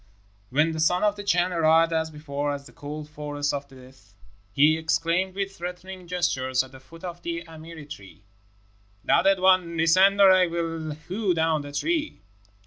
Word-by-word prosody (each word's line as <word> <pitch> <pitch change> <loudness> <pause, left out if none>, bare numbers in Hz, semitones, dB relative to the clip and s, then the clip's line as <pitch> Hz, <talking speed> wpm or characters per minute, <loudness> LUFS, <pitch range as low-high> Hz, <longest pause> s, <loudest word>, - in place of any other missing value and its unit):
When 155 +5 +2
the 160 - -5
Son 180 +4 +2
of 210 -1 +2
the 205 - -7
Chan 180 -2 +1
arrived 165 0 +3
as 160 0 0
before 145 -1 -4
at 140 0 -10
the - - -14
cold 150 +1 -8
Forest 145 -1 -3
of 140 0 -4
Death, 130 -6 -18 0.4
he 150 +7 +4
exclaimed 165 +3 0
with 195 0 -3
threatening 180 +1 -8
gestures 135 -8 0
at 130 - -14
the 130 - -13
foot 165 +6 -16
of 175 -1 -7
the 170 0 -4
amiri 160 -1 -11
tree, 100 -5 -12 0.8
"Thou - - +3
dead 195 +1 +3
one, 185 -2 +3
descend, 185 +5 +4
or 195 -1 +8
I 185 -1 +5
will 165 -2 -3
hew 190 -1 -1
down 160 -1 +1
the 145 0 -9
tree." 315 - -2
165 Hz, 180 wpm, -25 LUFS, 145-180 Hz, 0.8 s, or